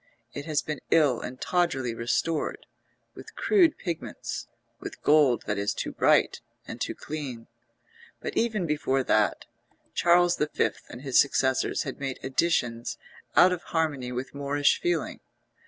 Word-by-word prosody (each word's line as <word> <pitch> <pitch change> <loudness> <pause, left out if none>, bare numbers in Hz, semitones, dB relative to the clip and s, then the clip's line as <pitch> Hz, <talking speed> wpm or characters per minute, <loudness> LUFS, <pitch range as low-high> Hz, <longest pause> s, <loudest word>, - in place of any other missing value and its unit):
It 145 +2 -6
has 155 -2 0
been 150 -2 -5
ill 145 -7 +4
and 130 +1 -7
tawdrily 140 -9 0
restored, 135 +7 -1 0.5
with - - -12
crude 355 -7 +3
pigments, 170 -4 -5 0.3
with - - -8
gold 145 -6 +4
that 105 -1 -1
is 100 0 -1
too - - -3
bright - - +3 0.3
and - - -8
too - - -2
clean; 135 -7 -6 0.7
but - - -5
even 220 -5 0
before 140 -4 0
that, 110 -4 +1 0.5
Charles 175 0 +4
V. 150 - +1 0.4
and 120 - -10
his 135 -3 +3
successors 130 -1 +2
had - - -6
made 135 -2 -3
additions 120 -5 0 0.4
out 185 - +7
of 175 - -4
harmony 145 -6 -2
with 125 +2 -5
Moorish 145 +1 +1
feeling. 350 0 -1
145 Hz, 140 wpm, -27 LUFS, 125-165 Hz, 0.7 s, out